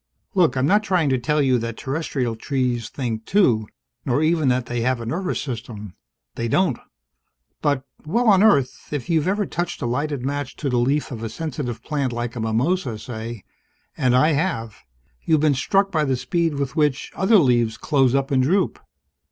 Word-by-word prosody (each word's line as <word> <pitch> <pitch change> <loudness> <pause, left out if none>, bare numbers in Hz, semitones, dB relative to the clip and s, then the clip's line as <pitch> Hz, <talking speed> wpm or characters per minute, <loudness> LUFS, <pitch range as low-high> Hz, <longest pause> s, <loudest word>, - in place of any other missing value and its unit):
Look, 175 -8 +3
I'm 130 - +2
not 205 +8 +4
trying 180 -8 +1
to 130 -1 +1
tell 150 +4 +1
you 130 -2 +3
that 115 0 -5
terrestrial 135 -4 -2
trees 125 -2 -1
think, 115 -5 -4
too, 120 - +3 0.4
nor 135 +4 +1
even 160 -2 +2
that 125 -1 +1
they 120 0 -3
have 130 +1 +1
a 115 - -6
nervous 180 +10 -2
system. 115 -6 -6 0.4
They 115 - -3
don't. 165 +1 +1 0.8
But 145 -3 0 0.2
well, 230 +10 0
on 195 -3 +6
Earth, 140 -12 +2
if 145 +2 -3
you've 160 0 +2
ever 205 +2 +1
touched 175 0 -3
a - - -3
lighted 140 +2 -2
match 145 -1 -3
to 140 - -3
the 125 - +2
leaf 140 +5 0
of 115 -3 -6
a 115 - -3
sensitive 125 -6 -5
plant 140 -4 -1
like 120 0 -3
the 120 - -6
mimosa, 120 +4 0
say 110 -2 -7 0.5
and 125 -1 +2
I 150 +5 +5
have 130 - -1 0.5
you've 155 -2 +2
been 155 -2 +4
struck 195 +9 +1
by 155 -4 +1
the 135 -3 0
speed 165 +5 0
with 140 -2 -3
which 150 -4 0
other 205 +3 +4
leaves 120 - +2
close 135 -4 +2
up 135 0 0
and 130 -1 +3
droop. 185 +9 +1
135 Hz, 190 wpm, -22 LUFS, 120-160 Hz, 0.8 s, on